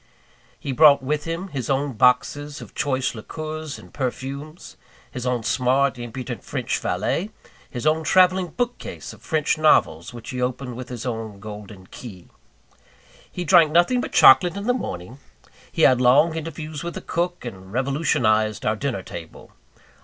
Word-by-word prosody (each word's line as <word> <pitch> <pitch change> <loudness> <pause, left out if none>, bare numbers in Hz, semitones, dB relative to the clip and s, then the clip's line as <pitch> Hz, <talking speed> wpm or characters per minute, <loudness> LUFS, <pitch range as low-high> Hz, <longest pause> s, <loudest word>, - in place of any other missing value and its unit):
He 140 - -4
brought 140 0 +6
with 150 +2 -1
him 165 +4 -4
his 135 -7 -4
own 140 0 0
boxes 145 +5 +2
of - - -11
choice 130 -2 -1
liqueurs 155 +5 -6
and - - -15
perfumes; 140 +4 -5 0.4
his 125 0 -5
own 125 -2 0
smart, 130 +2 +1
impudent, 120 +1 -6
French - - -2
valet; 195 +6 -1 0.4
his 125 +2 -6
own 155 +1 +2
travelling 185 +3 +4
bookcase 245 +8 -5
of - - -16
French 155 -2 0
novels, 85 - +3
which 120 -1 -9
he 125 0 -4
opened 125 0 -3
with 125 +1 -8
his 125 -1 -6
own 110 -4 -5
golden 105 -2 -10
key. 95 -3 -11 1.0
He 180 - -4
drank 155 -1 +5
nothing 175 +10 +3
but - - -5
chocolate 175 +7 +6
in 200 - -5
the 245 - +3
morning; 120 - -6 0.5
he - - 0
had 130 -1 +5
long 145 +6 +5
interviews 155 -1 -6
with 170 - -5
the - - -5
cook, 175 -2 -2
and 95 -5 -9
revolutionized 120 -5 +1
our 110 - +2
dinner 120 -5 -3
table. 85 -2 -10
135 Hz, 160 wpm, -23 LUFS, 120-155 Hz, 1.0 s, brought